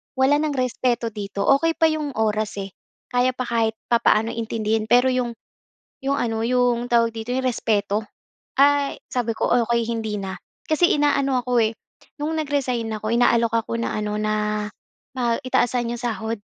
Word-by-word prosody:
wala 270 +2 +3
nang 300 -2 -1
respeto 245 -2 0
dito. 200 -1 -4
Okey 330 +3 +1
pa 325 - +4
‘yong 300 -3 -3
oras, 215 -1 0
eh, 195 - -9 0.4
kaya 250 +1 +3
pa 255 - -2
kahit 225 -2 +1 0.2
papaano 230 -1 +3
intindihin, 220 -1 -1
pero 245 +2 +6
‘yong 250 -2 0 0.7
‘yong 275 +1 +1
ano 225 -1 -1
‘yong 245 -1 +2
tawag 230 -1 +4
dito 225 +1 -7
‘yong 260 0 -1
respeto, 215 -3 0 0.6
ay 285 0 +3
sabi 240 -2 -1
ko, - - -1 0.2
"Okey, 235 0 +1
hindi 220 -3 -2
na." 190 -1 -5 0.3
Kasi 330 +3 +4
inaano 275 -3 +2
ako, 245 0 0
eh, 220 - -1 0.5
no’ng 320 +2 -1
nag-resign 255 -5 -1
ako, 215 0 -4
inaalok 235 -1 +3
ako 230 0 -3
na, - - -2
ano 210 0 -2
na, 210 0 -1 0.5
ma 235 -2 +1
i 255 - -7
taasan 240 -1 +1
‘yong - - -10
sahod, 225 -1 -2
235 Hz, 165 wpm, -23 LUFS, 220-255 Hz, 0.7 s, pero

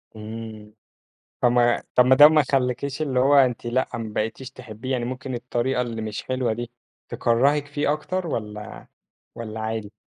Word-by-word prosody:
إمم. 110 -1 -8 0.7
طَب 120 - +4
ما 120 -1 +3
طَب 125 +1 +6
ده 145 +1 +11
ما 155 -1 +4
يخلّيكيش 135 +1 -1
اللي 135 -4 0
هو 135 +3 +4
أنتِ 125 -4 +3
لأ 125 +2 0
ما 110 -2 -6
بقيتيش 115 +5 -3
تحبيه؟ 125 0 -8
يعني 125 -2 0
ممكن 130 +1 -5
الطريقة 125 +1 -1
اللي 115 -2 -4
مش 110 -1 -5
حلوة 130 -3 -1
دي 120 +1 -6 0.4
تكرّهِك 140 +5 +2
فيه 145 0 0
أكتر 180 +3 -3
والّا 105 -5 -6 0.5
والّا 110 -1 -6
عادي؟ 110 -1 -4
125 Hz, 160 wpm, -24 LUFS, 110-135 Hz, 0.7 s, ده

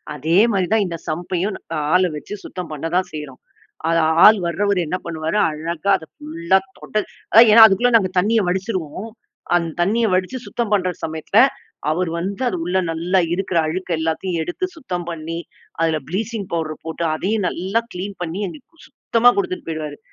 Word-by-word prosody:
அதே 160 +4 +1 0.2
மாரி 190 -3 +1
தான், 220 -2 +3
இந்த 170 -1 -5
சம்ப்பையும் 180 +5 -2 0.4
ஆளை 180 0 +4
வச்சு 150 - -7
சுத்தம் 180 -2 -7
பண்ண 150 +1 -5
தான் 185 +1 +1
செய்றோம். 150 -4 -8 0.5
அது 165 0 +3 0.3
ஆள் 215 0 +8
வர்றவரு 200 +2 0
என்ன 180 - -1
பண்ணுவாரு? 160 +2 -2
அழகா 160 +4 -4
அதை 160 - -12
ஃபுல்லா 165 +5 0 0.2
தொடச் 215 0 -2 0.2
அதான் 230 +2 +8
ஏன்னா 225 +1 +10
அதுக்குள்ள 220 +4 +3
நாங்க 190 -4 0
தண்ணீய 220 +4 +2
வடிச்சுருவோம். 185 +1 -3 0.5
அந்த 170 -2 0
தண்ணீய 220 +6 +2
வடிச்சு 185 +7 0
சுத்தம் 235 -3 -3
பண்ற 185 -3 +2
சமயத்தில, 160 -1 +1 0.5
அவர் 175 +2 0
வந்து 195 +6 -4
அது 185 - -3
உள்ள 180 +2 0
நல்லா 175 +4 +1
இருக்கிற 185 -1 -1
அழுக்கு 180 +3 -4
எல்லாத்தையும் 165 +2 -2
எடுத்து 175 - -3
சுத்தம் 180 - -5
பண்ணி, 165 0 -5 0.4
அதில 160 -1 +1
ப்ளீச்சிங் 205 +2 -3
பவுடர் 155 -2 -3
போட்டு, 165 +1 -4
அதையும் 205 +4 -1
நல்லா 190 +6 -1
கிளீன் 195 +3 -5
பண்ணி, 170 +3 -4
எங்களுக்கு 290 - -13
சுத்தமா 245 -2 +3
குடுத்துட்டு 370 -4 -2
போயிடுவாரு. 155 -2 -5
180 Hz, 165 wpm, -20 LUFS, 165-205 Hz, 0.5 s, ஏன்னா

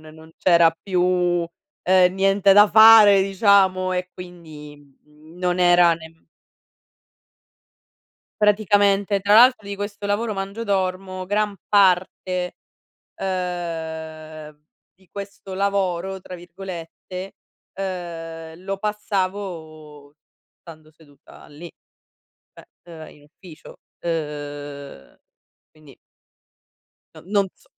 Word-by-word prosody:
non 160 0 -16
c'era 170 -2 +4
più 180 -2 0 0.4
ehm 185 0 +4
niente 195 +1 +3
da 205 +1 +6
fare 220 -2 +8
diciamo 190 -1 +2
e 180 0 -3
quindi, 160 -5 -12 0.3
mhmm, 155 +3 -19
non 180 0 -1
era 175 -1 +5
nem 160 0 -15 2.2
Praticamente. 205 -1 +2
Tra 205 +1 +2
l'altro 240 -1 +6
di 200 - -5
questo 205 0 -6
lavoro 210 +2 -1
mangio 195 +3 -5
dormo 185 -1 -2
gran 205 +1 -1
parte, 185 -2 +1 0.6
ehm, 160 -4 -6 0.3
di 190 0 -28
questo 200 -1 -9
"lavoro", 190 -1 -2
tra 180 - -9
virgolette, 180 +1 -9 0.4
ehm, 165 -3 -7
lo 195 +1 -4
passavo 185 -8 -5 0.5
stando 155 -2 -15
seduta 150 -2 -19
lì, 150 +4 -11 0.9
cioè - - -16 0.2
ehm, 165 -2 -12
in 145 - -22
ufficio. 160 +2 -15 0.3
Uhm 145 - -6 0.5
quindi 150 -4 -19 1.2
n - - -14
non 200 -2 +2
s - - -28
180 Hz, 95 wpm, -21 LUFS, 160-195 Hz, 2.2 s, fare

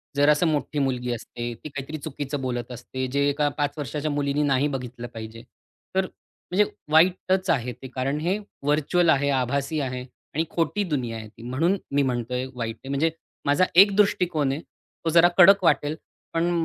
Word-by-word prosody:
जरा 145 +1 +5
असं 150 +3 +3
मोठी 150 -1 -1
मुलगी 125 -3 -1
असते. 120 +1 -5
ती 115 +7 -9
काहीतरी 140 +2 -6
चुकीचं 145 -1 -5
बोलत 120 -2 -3
असते, 130 +2 -5
जे 140 +1 +2
एका 145 +1 +1
5 145 -1 0
वर्षाच्या 150 +1 -3
मुलीने 145 0 0
नाही 140 0 +2
बघितलं 125 -2 -6
पाहिजे. 115 +1 -8 0.5
तर 190 0 +3 0.5
म्हणजे 205 +3 +4 0.3
वाईटच 185 +3 +3
आहे 125 -6 +1
ते 130 - -7
कारण 135 +3 -1
हे 180 +6 0 0.3
व्हर्चुअल 155 +4 +2
आहे, 140 -2 +3
आभासी 140 +3 0
आहे 130 -3 -3 0.3
आणि 160 - +1
खोटी 175 +5 0
दुनिया 130 - -2
आहे 110 -1 -8
ती. 110 +2 -15
म्हणून 155 +11 +1 0.2
मी 145 - +4
म्हणतोय, 125 0 -1
वाईट 115 -2 -3
आहे. 135 - -12
म्हणजे 150 +4 +1 0.3
माझा 145 +6 +4
एक 195 +2 +7
दृष्टिकोन 175 -8 +2
आहे, 145 +4 -3
तो 165 - -8
जरा 170 +1 +6
कडक 195 +2 +8
वाटेल. 150 -3 +2 0.4
पण 165 +1 +1
145 Hz, 175 wpm, -25 LUFS, 130-160 Hz, 0.5 s, कडक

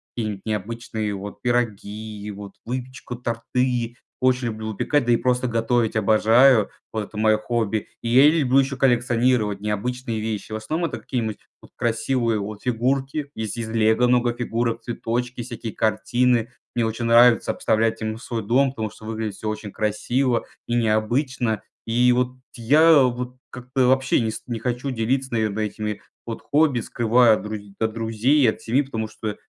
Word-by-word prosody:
какие-нибудь 105 -4 -3
необычные 110 0 -3
вот 100 +1 -8
пироги, 110 -3 -2
вот 100 -1 -9
выпечку, 125 0 -5
торты. 120 0 -2 0.2
Очень 130 -1 +2
люблю 110 0 -6
выпекать, 145 +7 +1
да 120 - +2
и 120 - +5
просто 125 +1 +1
готовить 115 0 +1
обожаю, 110 +3 +5 0.2
вот 110 -1 -1
это 105 - -11
мое 110 0 +4
хобби. 110 -2 -1
И - - -4
я 130 +5 +7
люблю 140 -5 +3
еще 135 0 0
коллекционировать 120 -4 +2
необычные 110 +3 -3
вещи. 110 -1 -4
В - - -2
основном 155 +11 -2
это - - -6
какие-нибудь 110 -5 -3 0.2
вот - - -17
красивые 115 -1 0
вот 105 +1 -6
фигурки, 135 +4 -1
есть 110 0 -4
из 115 -1 -3
"Лего" 110 +2 +3
много 120 -1 +3
фигурок, 115 -1 -1
цветочки, 120 +1 -3
всякие 115 -1 -6
картины. 120 +2 +1 0.2
Мне 120 -1 +1
очень 115 +1 -3
нравится 115 0 +5
обставлять 110 +1 0
ими 110 0 -2
свой 115 -2 -5
дом, 130 +5 +3
потому 110 -5 -4
что - - -16
выглядит 110 -2 -4
всё 110 - -4
очень 105 -1 -5
красиво 120 +4 0 0.2
и 120 - +1
необычно. 115 +1 0 0.2
И 120 +2 +3
вот 125 +1 0 0.2
я 150 +5 +5
вот 125 0 -2
как-то 125 0 -1
вообще 130 0 +3
не 110 -1 -1
ст - - -7
не 120 -2 -3
хочу 125 +3 -2
делиться, 130 +2 -1
наверное, 110 -1 0
этими 105 0 -4 0.2
вот 115 -1 -6
хобби, 145 -4 +2
скрываю 120 +1 +3
от - - -5
друз 105 0 -4 0.2
от 110 -1 0
друзей 115 +6 +1
и - - +5
от 110 - 0
семьи, 130 +6 +1
потому 110 -5 -4
что 110 -1 -5
115 Hz, 165 wpm, -23 LUFS, 110-125 Hz, 0.2 s, я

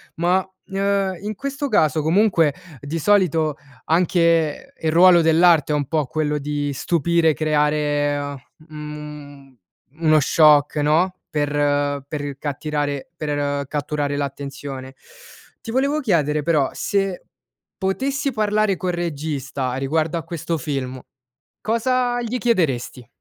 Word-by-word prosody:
Ma, 180 +3 +1 0.2
uhm, 195 -1 0
in 210 +1 -4
questo 280 +4 -3
caso 155 -6 +2
comunque 165 -3 +3 0.3
di 155 +3 -4
solito 165 -6 +2 0.3
anche 170 - +1
il 160 -1 0
ruolo 175 +1 +7
dell'arte 160 -2 +4
è - - +2
un 145 -2 -1
po' 155 -3 0
quello 150 +2 -1
di 145 0 -2
stupire, 165 +3 +1
creare 150 -1 +1
a 145 -1 -4 0.3
mhmm, 150 -3 -9 0.4
uno 155 -1 +5
shock, 150 0 +4
no, 160 +5 +2 0.2
per 145 -1 0 0.6
per 145 -2 -5
cattirare 145 0 -3
per 145 -2 -2
catturare 145 0 -2
l'attenzione. 140 -1 -5 0.7
Ti 225 - -4
volevo 280 +4 +1
chiedere, 150 - +1
però, 150 -5 +2
se 195 -2 -1 0.5
potessi 270 +8 -1
parlare 215 -3 +1
col 180 0 -2
regista 145 -6 -3
riguardo 155 +4 -1
a - - -7
questo 165 -1 -4
film, 130 -2 -4 0.6
cosa 245 +2 0
gli 245 +2 -3
chiederesti? 135 - 0
155 Hz, 120 wpm, -21 LUFS, 145-185 Hz, 0.7 s, ruolo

